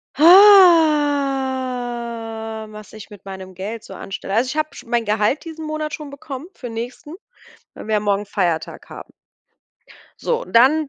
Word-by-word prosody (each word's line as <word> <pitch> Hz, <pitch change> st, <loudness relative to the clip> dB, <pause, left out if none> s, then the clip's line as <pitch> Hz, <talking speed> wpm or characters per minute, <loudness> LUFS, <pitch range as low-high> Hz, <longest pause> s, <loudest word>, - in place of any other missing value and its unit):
Ha, 265 Hz, -, +3 dB
was 215 Hz, 0 st, -12 dB
ich 215 Hz, -2 st, -11 dB
mit 205 Hz, -3 st, -15 dB
meinem 190 Hz, -1 st, -9 dB
Geld 210 Hz, +5 st, -6 dB
so -, -, -11 dB
anstelle. 195 Hz, 0 st, -6 dB
Also, 235 Hz, +4 st, +2 dB
ich 265 Hz, -, -5 dB
habe 310 Hz, -2 st, -2 dB
sch -, -, -11 dB
mein 235 Hz, -1 st, -1 dB
Gehalt 210 Hz, +6 st, 0 dB
diesen 320 Hz, -1 st, -8 dB
Monat 310 Hz, 0 st, -4 dB
schon 300 Hz, -2 st, -8 dB
bekommen 280 Hz, +1 st, -9 dB
für 250 Hz, -, -9 dB
nächsten, 240 Hz, +6 st, -7 dB, 0.6 s
weil -, -, -10 dB
wir 220 Hz, -, -1 dB
ja 210 Hz, -, +2 dB
morgen 205 Hz, 0 st, -1 dB
Feiertag 175 Hz, -5 st, -3 dB
haben. -, -, -11 dB, 1.1 s
So, 485 Hz, 0 st, -1 dB
und -, -, -13 dB
dann 280 Hz, +6 st, +4 dB
245 Hz, 160 wpm, -20 LUFS, 215-305 Hz, 1.1 s, dann